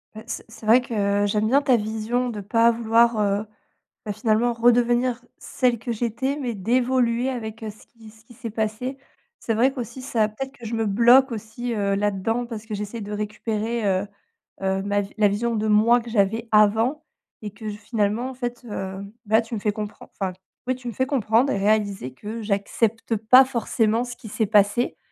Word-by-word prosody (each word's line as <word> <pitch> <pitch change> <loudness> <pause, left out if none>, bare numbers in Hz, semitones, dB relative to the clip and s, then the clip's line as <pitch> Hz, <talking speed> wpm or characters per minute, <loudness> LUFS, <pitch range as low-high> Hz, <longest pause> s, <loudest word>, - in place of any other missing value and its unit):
Bah, 220 - -8
c'est - - -5
c'est 225 0 -13
vrai 235 +4 +6
que 205 -4 0
j'aime 210 +1 +1
bien 275 +5 +4
ta 260 -3 +4
vision 225 +3 -1
de 220 -3 -5
pas 230 +3 +3
vouloir, 230 0 +3
heu, 205 0 +1 0.6
bah, 210 - -2
finalement 220 +3 +1
redevenir 240 +1 +2
celle 245 -3 0
que 235 +1 -3
j'étais. 240 +4 -2
Mais 250 -5 -3
d'évoluer 245 +3 +1
avec 225 -3 -5
ce 215 -1 -9
qui 225 -2 -16
ce 220 +1 -20
qui 240 - -16
s'est 230 -1 -7
passé. 220 +5 -3 0.4
C'est 230 - -2
vrai 245 +5 +3
qu'aussi 250 -1 -7
ça 230 -5 +1
peut-être 265 +6 -6
que 235 - -11
je 225 +1 -3
me 225 0 0
bloque 240 +6 +5
aussi, 230 +2 -5
heu, 200 -2 0
là-dedans 205 +4 -1
parce 225 -2 -7
que 220 - -7
j'essaie 210 +3 -5
de 205 0 -7
récupérer, 215 +2 -3
heu 190 +1 +1 0.6
heu, 190 0 0
ma 205 0 -1 0.2
la 210 -1 +5
vision 230 +4 -1
de 215 0 -1
moi 220 +3 +4
que 235 - -10
j'avais 225 +1 0
avant 220 +8 +3 0.4
et 210 - -5
que, 215 +2 -7
je 205 - -6
finalement 215 +2 -1
en - - -7
fait, 245 -1 -5
hem, 195 0 -6 0.2
là 220 +2 +4
tu 230 +1 -10
me - - -3
fais 210 +1 0
compren 210 0 -7
enfin, 190 -2 -1 0.3
oui 255 - +2
tu 250 -1 -10
me - - -6
fais 260 - 0
comprendre 255 -1 +2
et - - -1
réaliser 200 -9 0
que 220 - -6
j'accepte 220 +2 -1
pas 235 +5 +6
forcément 230 -2 0
ce 245 -1 -7
qui - - -11
s'est 220 +2 0
passé. 205 +3 +2
225 Hz, 200 wpm, -23 LUFS, 210-240 Hz, 0.6 s, vrai